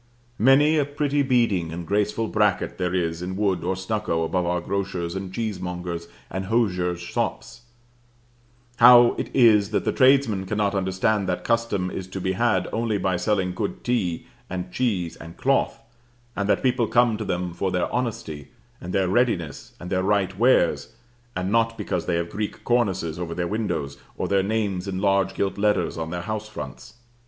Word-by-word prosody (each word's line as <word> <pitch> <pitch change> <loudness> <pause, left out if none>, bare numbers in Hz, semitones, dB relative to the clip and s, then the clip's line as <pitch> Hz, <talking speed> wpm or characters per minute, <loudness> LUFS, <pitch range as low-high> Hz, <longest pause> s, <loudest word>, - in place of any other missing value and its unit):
Many 145 +6 +5
a 145 - +2
pretty 145 0 0
beading 115 - +1
and 85 +1 -6
graceful 105 +4 0
bracket 105 -5 0
there 90 0 -1
is 85 -2 -1
in 90 +1 -4
wood 100 -2 0
or 95 - 0
stucco 95 -3 -1
above 90 +2 -1
our 90 0 +1
grocers' 90 -2 -3
and 95 -1 -5
cheese 110 0 -3
mongers' 90 -1 -5 0.2
and 95 +2 -3
hosiers' 90 -5 0
shops: 85 +6 -4 1.2
how 120 0 +8
it - - -3
is 110 -5 +5
that 110 - -1
the - - +2
tradesmen 130 -8 +3
cannot 105 0 0
understand 95 +1 0
that 90 - -2
custom 115 -6 0
is 95 - -5
to 95 +1 -6
be 95 0 -1
had 95 -2 +1
only 115 -2 0
by 95 -1 0
selling 90 0 0
good 100 +2 -4
tea 100 -9 -1 0.2
and 90 0 -5
cheese 90 -7 -1
and 85 0 -11
cloth, 135 0 +1 0.6
and 100 0 -2
that - - +2
people 125 -3 +2
come 120 -1 +3
to 110 - -4
them 90 -3 -2
for 95 +2 -1
their 90 -1 0
honesty, 115 - -3 0.3
and 90 +1 -6
their 95 -2 +2
readiness, 95 - 0
and 90 - -8
their 95 -1 +1
right 95 -1 +1
wares, 115 0 +2 0.4
and 90 +1 -2
not 115 0 +2
because 90 -5 -3
they 85 - +1
have 85 0 -2
Greek 105 0 -4
cornices 95 -9 0
over 85 -2 -4
their 90 - -1
windows, 80 -10 -3 0.2
or - - -2
their 100 -1 +2
names 100 -2 -1
in 95 -1 -3
large 95 0 +1
gilt 100 0 -1
letters 105 -4 +1
on 80 -1 -4
their 85 0 -4
house 110 +2 -4
fronts? - - -8
95 Hz, 180 wpm, -24 LUFS, 90-115 Hz, 1.2 s, how